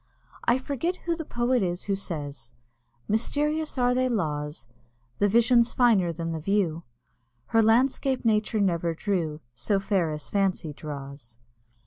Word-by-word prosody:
I 240 - +4
forget 280 +6 -2
who 340 -1 +1
the 325 - -5
poet 240 0 +1
is 175 -1 -1
who 200 - 0
says 145 -10 -6 0.5
"Mysterious 295 +8 0
are 245 0 +3
thy 255 +1 +2
laws; 150 - -2 0.5
The 205 - +4
vision's 235 +2 +4
finer 220 -9 +4
than 165 0 -4
the 160 - -3
view; 170 -2 0 0.7
Her 225 - +4
landscape 255 +3 +2
Nature 215 -1 +2
never 170 -3 +1
drew 165 -5 -2
So 160 - 0
fair 195 -4 +1
as 150 -1 -5
Fancy 190 -6 0
draws." 140 -5 -8
200 Hz, 140 wpm, -26 LUFS, 160-240 Hz, 0.7 s, I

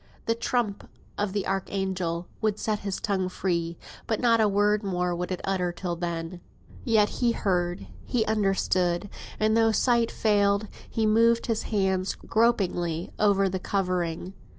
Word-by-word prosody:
The 230 - +2
trump 230 -3 -2 0.3
of 205 -1 -1
the 200 0 -2
archangel 190 -3 -2
would 215 -2 +1
set 215 -1 -1
his 200 -2 -3
tongue 195 -4 -1
free; 170 -3 -2 0.3
but 220 - 0
not 230 -2 +4
a 215 - +4
word 205 +1 +2
more 180 -3 -1
would 180 +2 -4
it 185 - -3
utter 185 -2 0
till 175 0 -4
then. 170 0 -4 0.4
Yet 215 -3 +3
he 240 -1 +3
heard, 175 - -1 0.2
he 230 -3 0
understood, 195 -3 +1 0.3
and 215 0 +3
though 225 0 +4
sight 235 +1 +2
failed, 205 -1 +2 0.2
he 225 - 0
moved 230 +2 +4
his 225 -2 0
hand 190 -3 0
gropingly 180 -7 +1
over 200 -2 +4
the 190 0 -2
covering. 180 -2 -2
195 Hz, 150 wpm, -27 LUFS, 180-215 Hz, 0.4 s, not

